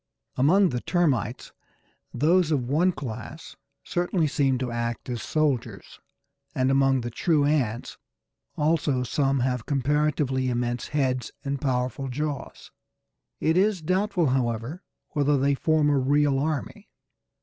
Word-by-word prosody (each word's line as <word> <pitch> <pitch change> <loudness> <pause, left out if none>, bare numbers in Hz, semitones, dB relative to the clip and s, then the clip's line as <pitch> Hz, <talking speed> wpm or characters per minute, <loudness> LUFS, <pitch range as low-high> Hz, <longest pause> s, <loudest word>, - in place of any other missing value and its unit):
Among 180 +9 +4
the 125 -2 -3
Termites, 140 - 0 0.6
those 165 +6 +2
of 135 -6 0
one 165 +7 +3
class 135 +1 -8 0.3
certainly 175 -1 0
seem 140 -3 +1
to 125 -1 -3
act 120 0 -3
as 120 -3 -3
soldiers, 150 -5 -2 0.6
and 130 +1 +2
among 135 -1 +3
the 120 0 -5
true 150 +4 +1
ants 130 -6 -1 0.6
also 150 -4 +1
some 135 +1 0
have 125 -2 -1
comparatively 140 -1 0
immense 120 0 -2
heads 130 -4 -1 0.2
and 140 0 -2
powerful 130 0 -1
jaws. 145 +2 -5 0.7
It 160 - +1
is 195 -3 +2
doubtful, 185 -2 +1
however, 125 - -1 0.3
whether 145 -1 +1
they 140 +1 +2
form 155 +2 +2
a 140 - +3
real 140 +1 +2
army. 150 -1 -3
140 Hz, 125 wpm, -25 LUFS, 125-155 Hz, 0.7 s, Among